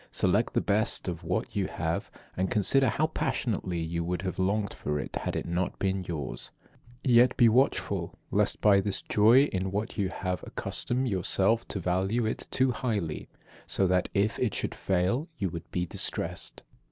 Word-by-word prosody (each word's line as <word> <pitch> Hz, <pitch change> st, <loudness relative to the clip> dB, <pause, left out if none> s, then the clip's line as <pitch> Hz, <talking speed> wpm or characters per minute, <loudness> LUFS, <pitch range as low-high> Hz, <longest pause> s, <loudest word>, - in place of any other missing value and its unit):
Select -, -, +1 dB
the -, -, +3 dB
best 105 Hz, +1 st, 0 dB
of 90 Hz, -1 st, -4 dB
what 90 Hz, +8 st, -2 dB
you 100 Hz, -2 st, +1 dB
have, 80 Hz, 0 st, -2 dB, 0.3 s
and 95 Hz, +1 st, 0 dB
consider 125 Hz, +5 st, +4 dB
how 155 Hz, -, +1 dB
passionately 100 Hz, -, -1 dB
you 85 Hz, +1 st, -2 dB
would 90 Hz, +2 st, -2 dB
have 95 Hz, -1 st, -3 dB
longed 100 Hz, +2 st, 0 dB
for 75 Hz, 0 st, -3 dB
it 65 Hz, -, -6 dB
had -, -, -3 dB
it -, -, -2 dB
not 90 Hz, +2 st, -2 dB
been 95 Hz, -1 st, -1 dB
yours. 70 Hz, -8 st, -3 dB, 0.5 s
Yet 125 Hz, -1 st, +5 dB
be 120 Hz, -, +7 dB
watchful, 125 Hz, +5 st, +1 dB
lest -, -, +1 dB
by 100 Hz, -2 st, +5 dB
this 100 Hz, 0 st, -3 dB
joy 115 Hz, +6 st, +5 dB
in 95 Hz, -9 st, -1 dB
what 105 Hz, +3 st, -3 dB
you 95 Hz, -2 st, +1 dB
have 90 Hz, -2 st, -3 dB
you -, -, -10 dB
accustom 125 Hz, +2 st, -2 dB
yourself 100 Hz, +1 st, +1 dB
to 100 Hz, -, -4 dB
value 95 Hz, +6 st, 0 dB
it 110 Hz, -, -3 dB
too 130 Hz, 0 st, +2 dB
highly; 105 Hz, -, -2 dB, 0.4 s
so 95 Hz, -, +1 dB
that, 90 Hz, 0 st, +2 dB
if 100 Hz, +2 st, +1 dB
it 120 Hz, -6 st, 0 dB
should -, -, -2 dB
fail, 95 Hz, -, 0 dB
you 95 Hz, -, -1 dB
would 85 Hz, -1 st, -7 dB
be 90 Hz, 0 st, -1 dB
distressed. -, -, -2 dB
95 Hz, 180 wpm, -28 LUFS, 90-115 Hz, 0.5 s, be